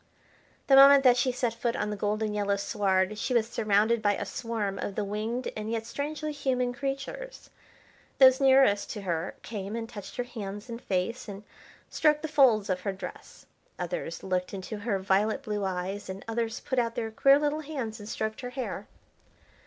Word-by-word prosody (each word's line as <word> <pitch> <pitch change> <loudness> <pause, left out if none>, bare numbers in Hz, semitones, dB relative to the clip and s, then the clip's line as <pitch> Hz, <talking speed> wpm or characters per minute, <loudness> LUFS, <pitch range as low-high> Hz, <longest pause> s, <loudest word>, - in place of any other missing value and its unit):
The 270 - +5
moment 275 0 +9
that 250 -2 +7
she 250 +1 +2
set 245 -2 -1
foot 230 0 -2
on 210 - -2
the - - -2
golden 210 +1 -1
yellow 205 -1 +1
sward 200 0 0
she 250 - -1
was 225 -2 +3
surrounded 215 0 +2
by 205 -2 +2
a - - -4
swarm 215 -5 -3
of 200 - -4
the 210 - -1
winged, 215 +5 -3
and 215 0 -4
yet 225 -1 -2
strangely 305 +4 -4
human 255 -4 -1
creatures. 275 - -5 0.7
Those 260 -1 +7
nearest 265 -6 +5
to 210 - -6
her 170 -2 -2
came 205 -1 -5
and 230 -1 -4
touched 205 -3 -9
her 245 - -1
hands 210 -2 -7
and 235 +1 -6
face, 200 +7 -2
and 200 0 -8 0.4
stroked 300 -1 +2
the - - -1
folds 255 -9 +4
of 185 -1 0
her 200 - -1
dress. 190 -1 -10 0.3
Others - - -4
looked 185 +1 -2
into 195 +3 -6
her 205 -1 -1
violet 195 +3 +1
blue 210 -1 -2
eyes, 190 +2 -3
and 190 +1 -7
others 225 0 -2
put 260 - -1
out 230 -1 -1
their 225 -2 -3
queer 275 +5 +5
little 295 +1 0
hands 265 -8 -5
and 205 +1 -9
stroked 220 +1 -3
her 250 - -5
hair. 255 0 -5
225 Hz, 190 wpm, -28 LUFS, 205-255 Hz, 0.7 s, moment